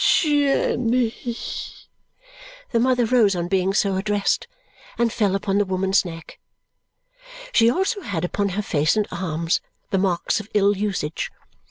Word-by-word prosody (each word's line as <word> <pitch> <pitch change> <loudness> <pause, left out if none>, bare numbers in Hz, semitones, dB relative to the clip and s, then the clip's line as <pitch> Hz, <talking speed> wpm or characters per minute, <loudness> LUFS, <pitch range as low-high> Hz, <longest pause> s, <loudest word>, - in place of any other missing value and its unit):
Jenny!" 255 -6 +2 1.6
The 230 - +2
mother 250 0 +3
rose 220 -5 +3
on 175 -1 -2
being 190 0 +1
so 195 -1 +1
addressed 205 +1 0 0.5
and 235 -1 +1
fell 200 -4 +1
upon 195 0 0
the - - +4
woman's 190 +1 +1
neck. 165 -3 -9 1.1
She 230 - +5
also 385 - 0
had 180 - -3
upon 200 +3 -1
her 210 - 0
face 155 +2 +1
and 210 - +1
arms 170 -2 -1 0.3
the 195 - +2
marks 185 +1 0
of 210 0 -9
ill 205 0 +4
usage. 190 -6 -2
200 Hz, 140 wpm, -22 LUFS, 185-230 Hz, 1.6 s, She